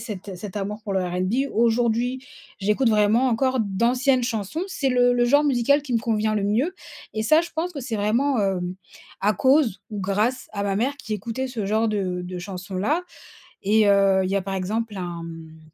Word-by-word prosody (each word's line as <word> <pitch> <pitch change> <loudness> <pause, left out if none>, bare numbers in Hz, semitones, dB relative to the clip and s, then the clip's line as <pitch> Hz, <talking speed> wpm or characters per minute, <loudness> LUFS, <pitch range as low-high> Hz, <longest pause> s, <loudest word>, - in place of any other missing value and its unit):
cet 205 -4 -7
cet 195 +2 -8
amour 210 +2 -3
pour 200 - -3
le 190 - +2
R&B. 185 +10 -1
Aujourd'hui, 235 +2 +1 0.4
j'écoute 210 +6 +2
vraiment 215 +4 +3
encore 260 +2 +1
d'anciennes 245 +6 +1
chansons. 230 - -3
C'est 285 -8 -1
le 245 0 +4
le 240 - +3
genre 290 +4 +4
musical 280 +1 +3
qui 265 -4 -6
me 230 - +2
convient 215 -1 0
le 205 - 0
mieux. 245 - +1 0.4
Et 220 - -1
ça, 310 +7 +5
je 340 - -7
pense 345 +3 -1
que 295 - -7
c'est 240 -3 -4
vraiment, 230 +5 +1
heu, 195 -2 +1 0.6
à 210 +2 +2
cause 260 - +3
ou 205 -2 -4
grâce 210 +7 0
à 200 -1 -3
ma 200 -1 0
mère 265 +6 0
qui 215 - -4
écoutait 230 +6 -4
ce 235 -5 -4
genre 220 +3 +1
de 185 -4 -2
de 180 0 -6
chansons-là. 195 - -2 0.6
Et, 210 +2 +4
heu, 195 -1 +4
il 185 - -2
y - - +1
a, - - -1
par 195 0 -3
exemple, 210 +3 -2
un, 175 -2 -5
hem, 165 -1 -10
220 Hz, 200 wpm, -24 LUFS, 195-250 Hz, 0.6 s, ça